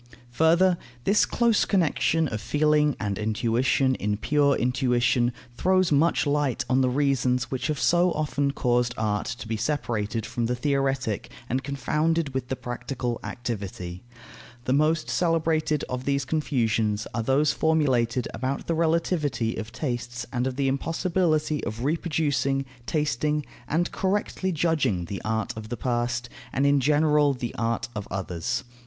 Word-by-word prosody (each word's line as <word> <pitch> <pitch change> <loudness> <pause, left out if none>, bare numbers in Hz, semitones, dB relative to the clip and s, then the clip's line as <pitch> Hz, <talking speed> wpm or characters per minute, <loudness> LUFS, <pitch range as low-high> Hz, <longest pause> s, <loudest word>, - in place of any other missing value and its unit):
Further, 170 +6 +4 0.2
this 205 +8 +3
close 235 -3 +3
connection 165 -3 +2
of 105 -2 -4
feeling 150 +4 +2
and 100 -1 -2
intuition 115 +5 +1
in 105 -4 -1
pure 145 +4 +2
intuition 125 -1 +2 0.2
throws 185 +5 +2
much 155 +4 +3
light 145 -3 0
on 130 +1 +3
the 130 - +3
reasons 125 -2 +1
which 130 -2 -2
have 150 -2 -2
so 175 +1 +3
often 145 -2 0
caused 125 -3 +1
art 105 -1 -1
to 125 -3 -5
be 110 - -1
separated 115 -4 -2
from 120 -1 -2
the 125 - 0
theoretic 135 -4 -1 0.2
and 130 +3 -1
confounded 150 +3 0
with 130 -1 -2
the 130 - -2
practical 120 -1 -4
activity. 100 -7 -5 0.6
The 130 - +1
most 155 +3 +2
celebrated 160 -3 +1
of 125 0 -4
these 140 -1 0
confusions 115 -8 0
are 115 - -1
those 135 +5 +2
formulated 130 -7 +1
about 130 +2 -3
the 170 - 0
relativity 160 -8 0
of 110 +1 -6
tastes 120 -2 -4
and 125 0 0
of 130 - -3
the 135 0 0
impossibility 155 +2 0
of 115 +1 -4
reproducing, 145 -3 0 0.2
tasting, 150 0 0 0.2
and 170 +5 0
correctly 190 -1 -1
judging 155 - +1
the 100 +3 -5
art 110 0 -1
of 110 0 -8
the 120 - -4
past, 120 -1 -1 0.2
and 135 - +1
in 140 0 +4
general 150 0 +3
the 120 -2 -4
art 115 +1 -1
of 105 -2 -4
others. 95 +6 -3
135 Hz, 150 wpm, -26 LUFS, 120-155 Hz, 0.6 s, Further